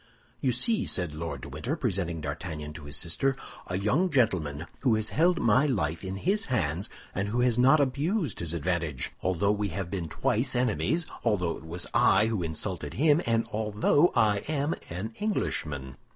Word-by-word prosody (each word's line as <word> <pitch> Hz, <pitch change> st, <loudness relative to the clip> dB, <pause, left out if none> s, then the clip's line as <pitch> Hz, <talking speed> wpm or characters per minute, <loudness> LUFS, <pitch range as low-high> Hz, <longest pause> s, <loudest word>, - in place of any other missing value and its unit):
"You 130 Hz, -, +1 dB
see," 210 Hz, -, +4 dB
said 90 Hz, -5 st, +2 dB
Lord 80 Hz, +2 st, -5 dB
de -, -, -8 dB
Winter, 80 Hz, -, -3 dB
presenting 95 Hz, -, -2 dB
D'Artagnan 75 Hz, 0 st, -5 dB
to 75 Hz, -1 st, -10 dB
his 70 Hz, 0 st, -2 dB
sister, 130 Hz, -, +1 dB, 0.3 s
"a 90 Hz, -, -2 dB
young 125 Hz, -, +2 dB
gentleman 90 Hz, -, +1 dB
who 125 Hz, -5 st, +3 dB
has 110 Hz, 0 st, 0 dB
held 175 Hz, +2 st, +2 dB
my 125 Hz, +6 st, +4 dB
life 85 Hz, -, -1 dB
in 95 Hz, 0 st, -4 dB
his 195 Hz, -, 0 dB
hands, 95 Hz, -, -1 dB, 0.2 s
and 100 Hz, +1 st, -1 dB
who 120 Hz, +3 st, 0 dB
has 125 Hz, -1 st, +2 dB
not 135 Hz, +5 st, +6 dB
abused 145 Hz, -, 0 dB
his 85 Hz, -1 st, 0 dB
advantage, 85 Hz, -5 st, -2 dB
although 95 Hz, +2 st, +1 dB
we 105 Hz, 0 st, 0 dB
have 95 Hz, -1 st, -4 dB
been 90 Hz, -5 st, -3 dB
twice 125 Hz, -, 0 dB
enemies, 125 Hz, +7 st, +1 dB, 0.2 s
although 90 Hz, -7 st, +1 dB
it 80 Hz, -, -11 dB
was 85 Hz, +2 st, -5 dB
I 105 Hz, +3 st, +5 dB
who 110 Hz, -4 st, -1 dB
insulted 80 Hz, -1 st, -4 dB
him, 150 Hz, +3 st, +4 dB
and 115 Hz, 0 st, +2 dB
although 110 Hz, +10 st, +2 dB
I 105 Hz, -2 st, +4 dB
am 150 Hz, +1 st, 0 dB, 0.2 s
an 95 Hz, +7 st, -5 dB
Englishman. 75 Hz, -, -2 dB
105 Hz, 180 wpm, -28 LUFS, 85-130 Hz, 0.3 s, not